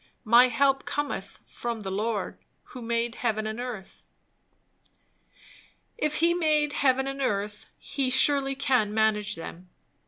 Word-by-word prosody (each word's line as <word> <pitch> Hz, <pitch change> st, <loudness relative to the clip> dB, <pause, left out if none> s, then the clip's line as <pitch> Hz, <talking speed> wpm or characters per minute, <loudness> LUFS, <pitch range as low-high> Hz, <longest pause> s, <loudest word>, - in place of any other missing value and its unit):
My 235 Hz, +3 st, +7 dB
help 270 Hz, +2 st, +1 dB
cometh 285 Hz, -9 st, -4 dB
from 235 Hz, -2 st, -5 dB
the 195 Hz, -2 st, -5 dB
Lord, 210 Hz, +2 st, -2 dB, 0.3 s
who 250 Hz, -, -9 dB
made 235 Hz, 0 st, -1 dB
heaven 220 Hz, -3 st, -1 dB
and 215 Hz, +2 st, -4 dB
earth." 240 Hz, -6 st, -7 dB, 1.9 s
If 300 Hz, -9 st, -1 dB
he 335 Hz, +2 st, +3 dB
made 305 Hz, -4 st, +1 dB
heaven 265 Hz, -2 st, +2 dB
and 275 Hz, 0 st, -4 dB
earth, 210 Hz, -3 st, -2 dB
he 270 Hz, -2 st, -2 dB
surely 270 Hz, +1 st, +4 dB
can 250 Hz, -6 st, +1 dB
manage 215 Hz, -2 st, +1 dB
them. 170 Hz, +2 st, -9 dB
240 Hz, 130 wpm, -27 LUFS, 215-275 Hz, 1.9 s, My